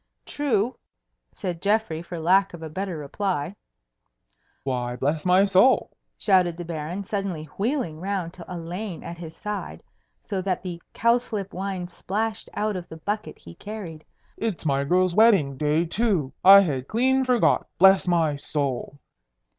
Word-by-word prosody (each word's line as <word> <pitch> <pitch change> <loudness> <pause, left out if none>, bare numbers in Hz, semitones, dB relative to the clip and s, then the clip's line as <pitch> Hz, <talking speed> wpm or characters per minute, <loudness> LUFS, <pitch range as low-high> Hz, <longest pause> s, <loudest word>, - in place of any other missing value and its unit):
"True," 250 -4 -1 0.5
said 175 -3 -5
Geoffrey, 205 -6 +1
for 170 0 -7
lack 185 +3 +3
of 165 - -10
a 160 - -6
better 185 0 -3
reply. 170 +3 -3 1.1
"Why, 125 -2 -2
bless 145 +6 -1
my 185 +2 +5
soul!" 200 +7 +4 0.3
shouted 180 -4 +3
the 175 - -6
Baron, 165 +4 -4
suddenly 195 -5 -3 0.2
wheeling 210 - -1
round 185 -2 -3
to 175 - -11
Elaine 175 +2 -5
at 170 0 -8
his 165 -2 -8
side, 210 -1 -5 0.4
so 195 -3 -3
that 185 -1 -2
the 175 -2 -6
cowslip 230 -4 +1
wine 190 -1 -3
splashed 215 +5 -3
out 210 -1 -1
of 180 -1 -6
the 160 - -9
bucket 210 +6 -4
he 85 - -13
carried, 180 - -8 0.3
"it's 215 -7 -3
my 140 -2 +1
girl's 180 +3 +2
wedding 195 -10 +4
day 150 +4 +1
too! 180 - 0
I 195 +1 +10
had 140 -8 -2
clean 260 +4 +2
forgot. 250 -2 +2
Bless 190 0 +6
my 165 -4 +2
soul!" 140 -1 -3
185 Hz, 150 wpm, -25 LUFS, 160-205 Hz, 1.1 s, I